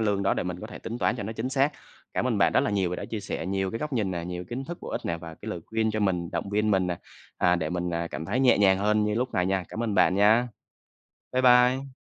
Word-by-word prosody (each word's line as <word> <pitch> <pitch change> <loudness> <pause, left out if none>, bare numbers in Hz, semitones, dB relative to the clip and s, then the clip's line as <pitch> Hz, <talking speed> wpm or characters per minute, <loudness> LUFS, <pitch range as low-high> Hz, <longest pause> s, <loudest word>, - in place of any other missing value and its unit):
lương 105 -3 +1
đó 95 - +2
để - - -1
mình 90 0 -5
có - - -6
thể - - -9
tính 115 +2 -6
toán 120 - +1
cho - - -4
nó 110 +3 -4
chính 115 +3 -3
xác. 135 +2 +2 0.4
Cảm - - 0
ơn - - +1
bạn - - +4
rất - - +4
là - - 0
nhiều 95 -3 0
và 90 - -2
đã - - -5
chia 110 -2 -4
sẻ 85 -3 -4
nhiều 95 0 -1
cái 115 - -4
góc 150 -2 -4
nhìn 105 -6 0
nè, 85 -2 -3
nhiều 90 0 -5
kiến 125 +7 -5
thức 175 +3 -7
bổ - - -8
ích - - -3
nè, 85 - -1
và 80 -1 -9
cái 110 - -10
lời 90 -5 -4
khuyên 110 0 0
cho 110 - -2
mình, 90 -4 0
động 100 - -3
viên 105 +1 +1
mình 95 -2 +2
nè, 90 -1 -2 0.4
à, 90 0 +4
để 80 -1 -2
mình, 90 0 -2
à, 85 0 -2
cảm 80 - -5
thấy 125 +10 -1
nhẹ 125 -5 +5
nhàng 95 -2 +5
hơn 105 +1 +2
như 105 0 0
lúc 125 +2 -2
này 90 0 +2
nha. 95 -1 0
Cảm 115 - -4
ơn 110 -3 -1
bạn 95 - +4
nha. 110 +5 +4 0.8
Bye 130 0 +1
bye. 125 +2 +4
105 Hz, 310 wpm, -27 LUFS, 90-115 Hz, 0.8 s, nhẹ